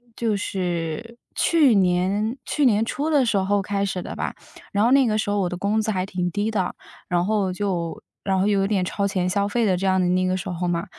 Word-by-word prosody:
就 220 Hz, -3 st, 0 dB
是 180 Hz, +4 st, -3 dB, 0.2 s
去 300 Hz, -8 st, +4 dB
年 195 Hz, +5 st, +1 dB
去 290 Hz, -, +1 dB
年 215 Hz, -1 st, +3 dB
初 290 Hz, +6 st, -2 dB
的 285 Hz, -5 st, +3 dB
时 215 Hz, -3 st, +1 dB
候 200 Hz, +1 st, +1 dB
开 200 Hz, 0 st, -1 dB
始 190 Hz, -2 st, -2 dB
的 -, -, -7 dB
吧。 -, -, -3 dB, 0.4 s
然 205 Hz, +2 st, +2 dB
后 245 Hz, -, +3 dB
那 270 Hz, -2 st, +5 dB
个 215 Hz, 0 st, +1 dB
时 215 Hz, -, -1 dB
候 205 Hz, -, +1 dB
我 180 Hz, -2 st, 0 dB
的 180 Hz, -, -4 dB
工 205 Hz, +3 st, +1 dB
资 220 Hz, -, -2 dB
还 185 Hz, -3 st, 0 dB
挺 180 Hz, -2 st, -2 dB
低 205 Hz, +5 st, -1 dB
的， 190 Hz, -4 st, -1 dB, 0.3 s
然 175 Hz, 0 st, +1 dB
后 205 Hz, -3 st, +1 dB
就 180 Hz, -4 st, -3 dB, 0.2 s
然 190 Hz, -1 st, +1 dB
后， 195 Hz, -, +2 dB
又 200 Hz, -2 st, +2 dB
有 195 Hz, -, +1 dB
点 195 Hz, -3 st, +1 dB
超 200 Hz, +1 st, -1 dB
前 185 Hz, -2 st, -1 dB
消 200 Hz, +2 st, +1 dB
费 230 Hz, +2 st, 0 dB
的 185 Hz, -3 st, +3 dB
这 190 Hz, +2 st, -1 dB
样 190 Hz, 0 st, +3 dB
的 180 Hz, -, +2 dB
那 185 Hz, 0 st, +2 dB
个 185 Hz, 0 st, 0 dB
时 185 Hz, -, -5 dB
候 180 Hz, 0 st, -2 dB
嘛， 170 Hz, +2 st, -1 dB
195 Hz, 270 characters per minute, -23 LUFS, 185-215 Hz, 0.4 s, 那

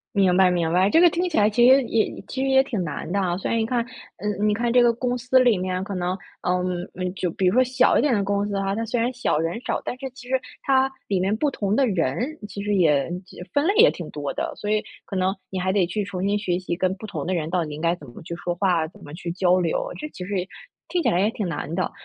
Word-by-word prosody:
明 190 Hz, -3 st, +4 dB
白 190 Hz, -1 st, +6 dB
明 170 Hz, -2 st, 0 dB
白， 185 Hz, +3 st, +3 dB
这 325 Hz, -, +5 dB
个 350 Hz, -, +8 dB
听 355 Hz, +2 st, -1 dB
起 330 Hz, -, -2 dB
来 210 Hz, 0 st, +5 dB
其 240 Hz, +3 st, +5 dB
实 265 Hz, 0 st, +6 dB
也 225 Hz, -2 st, +1 dB, 0.2 s
其 260 Hz, -, -3 dB
实 270 Hz, -, +1 dB
也 265 Hz, 0 st, +5 dB
挺 230 Hz, -8 st, -3 dB
难 155 Hz, +2 st, -5 dB
的 200 Hz, -, +1 dB
啊， 180 Hz, -2 st, 0 dB
所 -, -, -3 dB
以 -, -, +1 dB
你 225 Hz, -, +1 dB
看 235 Hz, 0 st, 0 dB, 0.3 s
嗯 210 Hz, 0 st, -1 dB
你 210 Hz, -, +3 dB
看 235 Hz, +2 st, 0 dB
这 245 Hz, 0 st, +5 dB
个 235 Hz, -1 st, +4 dB
公 245 Hz, +1 st, -1 dB
司 255 Hz, +2 st, +2 dB
里 245 Hz, -5 st, +4 dB
面 185 Hz, 0 st, -2 dB
可 200 Hz, -, -5 dB
能 180 Hz, +1 st, -2 dB, 0.2 s
呃， 180 Hz, 0 st, 0 dB, 0.5 s
就 180 Hz, -, -1 dB
比 190 Hz, -, -1 dB
如 180 Hz, -, +3 dB
说 255 Hz, -, +5 dB
小 255 Hz, 0 st, +3 dB
一 -, -, +4 dB
点 290 Hz, -4 st, +2 dB
的 205 Hz, -3 st, +1 dB
公 200 Hz, +1 st, 0 dB
司 205 Hz, -, -3 dB
啊， 195 Hz, 0 st, -1 dB
它 225 Hz, +3 st, -2 dB
虽 235 Hz, +1 st, -1 dB
然 240 Hz, +2 st, +1 dB
小 245 Hz, -10 st, 0 dB
人 165 Hz, +7 st, -1 dB
少， -, -, -2 dB
但 250 Hz, -, -5 dB
是 265 Hz, -1 st, -5 dB
其 260 Hz, 0 st, -13 dB
实 260 Hz, 0 st, +2 dB, 0.2 s
它 265 Hz, 0 st, +3 dB, 0.2 s
里 195 Hz, -, +1 dB
面 195 Hz, +3 st, +1 dB
不 285 Hz, +5 st, 0 dB
同 205 Hz, -4 st, -1 dB
的 275 Hz, -, +4 dB
人 165 Hz, -, 0 dB, 0.3 s
其 200 Hz, 0 st, -6 dB
实 205 Hz, 0 st, 0 dB
也 155 Hz, -4 st, +3 dB, 0.4 s
分 290 Hz, +3 st, +2 dB
类 400 Hz, -, +2 dB
也 470 Hz, +3 st, +7 dB
挺 -, -, -8 dB
多 -, -, -4 dB
的。 -, -, -3 dB
所 205 Hz, -, -5 dB
以 215 Hz, 0 st, +2 dB, 0.2 s
可 195 Hz, -, -5 dB
能 185 Hz, +1 st, +1 dB
你 190 Hz, -, -3 dB
还 185 Hz, +1 st, 0 dB
得 195 Hz, -3 st, +3 dB
去 195 Hz, +5 st, -2 dB
重 190 Hz, -2 st, -4 dB
新 205 Hz, +1 st, +1 dB
学 180 Hz, -3 st, 0 dB
习， 180 Hz, -2 st, -4 dB
跟 185 Hz, 0 st, 0 dB
不 215 Hz, -, -9 dB
同 170 Hz, -7 st, -5 dB
的 185 Hz, -, 0 dB
人 160 Hz, -2 st, -2 dB
到 175 Hz, -2 st, 0 dB
底 150 Hz, -, -7 dB
应 150 Hz, -, -7 dB
该 170 Hz, 0 st, +2 dB
怎 145 Hz, -, -13 dB
么 120 Hz, -, -12 dB
去 170 Hz, -, -6 dB
说 175 Hz, 0 st, -3 dB
话， 175 Hz, -4 st, +1 dB
怎 -, -, -17 dB
么 145 Hz, -, -10 dB
去 170 Hz, +1 st, -6 dB
交 185 Hz, 0 st, +3 dB
流， 170 Hz, -3 st, -1 dB
这 305 Hz, -, -4 dB
其 180 Hz, -, -8 dB
实 200 Hz, 0 st, -2 dB
也 180 Hz, -, -4 dB, 0.4 s
听 350 Hz, -2 st, -1 dB
起 -, -, +3 dB
来 175 Hz, -, +2 dB
也 205 Hz, +3 st, +3 dB
挺 210 Hz, -, -3 dB
难 155 Hz, 0 st, -4 dB
的。 185 Hz, -, -1 dB
200 Hz, 310 characters per minute, -24 LUFS, 180-240 Hz, 0.5 s, 个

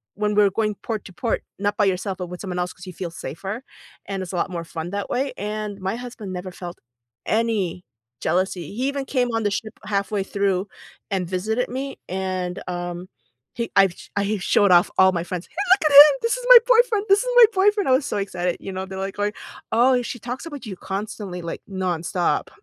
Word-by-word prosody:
when 210 Hz, +1 st, 0 dB
we're 205 Hz, -1 st, +5 dB
going 210 Hz, +2 st, 0 dB
port 220 Hz, -3 st, -4 dB
to 190 Hz, -, -11 dB
port, 230 Hz, +5 st, -2 dB, 0.2 s
not 205 Hz, +1 st, -1 dB
by 205 Hz, -, +3 dB
yourself, 190 Hz, 0 st, -1 dB
but 180 Hz, -, -4 dB
with 180 Hz, 0 st, -8 dB
someone 185 Hz, -3 st, -4 dB
else 180 Hz, 0 st, -2 dB
'cause 180 Hz, -, -13 dB
you 185 Hz, -, -7 dB
feel 175 Hz, 0 st, -5 dB
safer, 190 Hz, -, -6 dB, 0.4 s
and 195 Hz, -1 st, -3 dB
it's 185 Hz, -, -8 dB
a -, -, -2 dB
lot 175 Hz, -, 0 dB
more 170 Hz, -2 st, -4 dB
fun 165 Hz, 0 st, -6 dB
that 200 Hz, +1 st, -3 dB
way, 270 Hz, +2 st, -1 dB
and 210 Hz, 0 st, -4 dB
my 190 Hz, +2 st, -2 dB
husband 240 Hz, -6 st, -7 dB
never 180 Hz, +1 st, -5 dB
felt 175 Hz, -1 st, -8 dB, 0.5 s
any 215 Hz, -6 st, 0 dB, 0.4 s
jealousy, 185 Hz, -2 st, -1 dB
he 250 Hz, +5 st, -1 dB
even 280 Hz, -1 st, -2 dB
came 250 Hz, -3 st, 0 dB
on 225 Hz, -, 0 dB
the 205 Hz, -, +1 dB
ship 215 Hz, +2 st, -3 dB
halfway 200 Hz, 0 st, -1 dB
through 195 Hz, -1 st, 0 dB, 0.4 s
and 185 Hz, -3 st, -1 dB
visited 215 Hz, +7 st, -1 dB
me, 270 Hz, +2 st, -5 dB
and, 185 Hz, -1 st, -3 dB
um, 175 Hz, 0 st, -4 dB, 0.5 s
he 235 Hz, -2 st, -4 dB
I've 195 Hz, -3 st, +5 dB, 0.2 s
I 200 Hz, +1 st, 0 dB
showed 200 Hz, +1 st, +3 dB
off 175 Hz, +2 st, +5 dB
all 190 Hz, 0 st, +7 dB
my 170 Hz, -2 st, -2 dB
friends, 180 Hz, -1 st, -5 dB
"Hey, -, -, -26 dB, 0.2 s
look 360 Hz, -6 st, +2 dB
at -, -, -3 dB
him, 295 Hz, 0 st, +11 dB
this 465 Hz, +1 st, +1 dB
is -, -, -7 dB
my -, -, +12 dB
boyfriend, 470 Hz, -4 st, +4 dB
this 395 Hz, +1 st, +6 dB
is -, -, -3 dB
my 485 Hz, -1 st, +10 dB
boyfriend," 405 Hz, -2 st, +3 dB
I -, -, +4 dB
was 260 Hz, +2 st, +3 dB
so -, -, -2 dB
excited, 180 Hz, -3 st, -2 dB
you 195 Hz, -, -7 dB
know? 190 Hz, 0 st, -4 dB
They're 190 Hz, 0 st, -7 dB
like 195 Hz, 0 st, -4 dB
going, 205 Hz, +1 st, -1 dB, 0.4 s
"Oh, 250 Hz, +2 st, +4 dB
she 245 Hz, -, -5 dB
talks 245 Hz, +7 st, -6 dB
about 290 Hz, -6 st, -8 dB
you 200 Hz, -4 st, -6 dB
constantly, 195 Hz, -1 st, -5 dB
like, 170 Hz, 0 st, -6 dB
nonstop." 180 Hz, -2 st, -1 dB
200 Hz, 215 wpm, -23 LUFS, 185-235 Hz, 0.5 s, my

